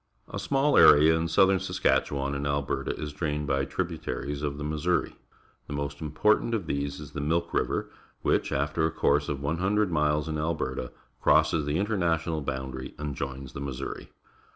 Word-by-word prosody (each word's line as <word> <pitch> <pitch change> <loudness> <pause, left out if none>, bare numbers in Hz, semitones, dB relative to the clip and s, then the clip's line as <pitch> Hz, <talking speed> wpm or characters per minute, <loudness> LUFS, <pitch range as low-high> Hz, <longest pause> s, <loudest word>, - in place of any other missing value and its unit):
A - - -5
small 140 +1 +3
area 80 +2 +8
in 80 0 0
southern 95 +3 +4
Saskatchewan 70 -6 0
and 70 0 -2
Alberta 70 -1 -2
is 75 -1 -5
drained 75 -1 -2
by 70 -1 0
tributaries 70 +1 -3
of 70 -1 -2
the 75 - -5
Missouri. 75 +4 0 0.5
The - - -5
most 70 +1 -4
important 105 +9 +2
of 100 -6 -3
these 70 -1 -2
Ls 75 -1 -9
the 75 - -4
Milk 85 +3 0
River, - - 0 0.4
which, - - +1
after 75 +4 0
a 80 - +3
course 75 0 +1
of 70 -1 -3
100 95 +7 +1
miles 75 -1 +1
in 80 -1 -2
.\lberta, 75 -5 -2 0.3
crosses 75 0 +3
the 75 - 0
international 85 -6 0
boundary 65 -1 -5
and 75 -1 -4
joins 65 -1 -6
the 70 - -6
^Missouri. 70 -1 -5
75 Hz, 170 wpm, -27 LUFS, 70-85 Hz, 0.5 s, area